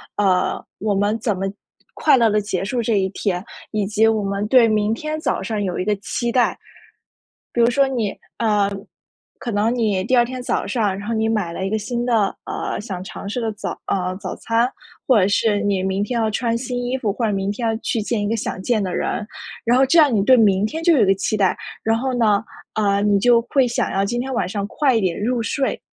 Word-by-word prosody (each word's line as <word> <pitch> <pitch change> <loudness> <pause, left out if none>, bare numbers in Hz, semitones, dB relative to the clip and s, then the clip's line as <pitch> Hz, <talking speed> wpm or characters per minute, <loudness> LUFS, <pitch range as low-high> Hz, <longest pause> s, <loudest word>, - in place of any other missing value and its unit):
呃， 185 -3 +1 0.2
我 205 -1 0
们 205 +3 +1
怎 215 -3 -1
么 190 - -2 0.5
快 300 - +4
乐 230 -2 +4
地 210 0 +2
结 195 -2 -3
束 240 +4 -1
这 225 -2 +1
一 190 - +1
天， 190 -2 -2 0.3
以 210 -2 0
及 215 +2 +2
我 220 -2 +1
们 200 +1 -2
对 240 0 +6
明 215 0 +1
天 305 +6 -4
早 - - -1
上 215 -2 -2
有 185 -3 -2
一 185 - -1
个 210 0 +1
期 235 +4 -3
待。 245 0 +2 1.0
比 240 - +2
如 235 - +5
说 275 +3 +3
你， 240 -6 -1
呃， - - -14 1.2
可 240 - -4
能 210 +3 +1
你 215 -6 +1
第 255 - +2
二 240 - +5
天 255 +1 -6
早 - - -1
上， 210 -6 0
然 200 - -7
后 230 - 0
你 220 0 +1
买 210 -7 -1
了 190 - -4
一 - - -3
个 220 - 0
新 240 +3 -3
的， 225 -5 +1
呃， - - -3
想 195 -4 -6
尝 200 - -8
试 230 +5 -3
的 225 -2 -2
早 210 - -6
呃， 185 -1 -1
早 195 - -5
餐， 230 +1 +1 0.4
或 250 -5 +5
者 185 - +3
是 205 0 +2
你 200 -2 0
明 190 +1 0
天 235 +3 -1
要 220 - +1
穿 230 +2 0
新 245 0 -3
衣 250 +2 -1
服， 215 -6 -1
或 230 +3 -3
者 210 - 0
明 195 0 -1
天 230 +2 -2
要 225 - 0
去 230 0 -2
见 220 +1 -1
一 205 - -1
个 225 - 0
想 205 - -4
见 220 +1 0
的 185 -2 -3
人。 210 - -2 0.4
然 240 +2 +3
后 265 - +5
这 335 +6 +4
样 295 -4 +4
你 210 - +3
对 255 +4 +6
明 205 -3 +4
天 320 +8 -5
就 340 0 +5
有 245 - +4
一 - - +4
个 195 - +4
期 195 +3 -1
待， 195 -3 +2 0.3
然 225 0 +2
后 260 +2 -1
呢， 215 -4 +3 0.3
呃， 200 -2 +1
你 205 -1 +3
就 240 +2 +5
会 265 -3 +3
想 235 - -1
要 195 +1 +1
今 240 +4 -1
天 265 +2 -4
晚 180 - 0
上 200 +1 -3
快 265 +2 +1
一 - - +2
点 185 -4 0
入 240 +2 0
睡。 270 +4 -1
220 Hz, 265 characters per minute, -21 LUFS, 200-240 Hz, 1.2 s, 对